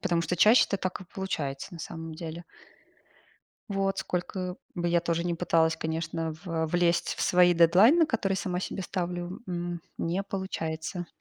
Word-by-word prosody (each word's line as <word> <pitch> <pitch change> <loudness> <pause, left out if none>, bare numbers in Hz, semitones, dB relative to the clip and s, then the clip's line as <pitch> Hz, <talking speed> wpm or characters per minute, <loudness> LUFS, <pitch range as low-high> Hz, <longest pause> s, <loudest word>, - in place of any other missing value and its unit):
Потому 170 -1 +1
что 175 +3 -1
чаще 215 +7 +7
это 200 - -1
так 185 -1 -3
и 185 - -9
получается, 170 -5 -4
на 170 - -8
самом 165 -1 -6
деле. 165 +1 -7 1.3
Вот. 195 -1 0
Сколько 180 0 -3 0.2
бы 175 -1 -1
я 170 0 +3
тоже 170 0 -1
не 175 -1 0
пыталась, 165 -1 +2
конечно, 160 0 -3
в 165 -2 -1
влезть 175 +1 +1
в - - -6
свои 180 0 +5
дедлайны, 200 - +6
которые 195 -7 0
сама 180 -2 -2
себе 190 - -4
ставлю, 175 0 -4
м, 175 -1 -3 0.2
не 175 +4 -1
получается. 175 -3 -4
175 Hz, 160 wpm, -28 LUFS, 165-185 Hz, 1.3 s, чаще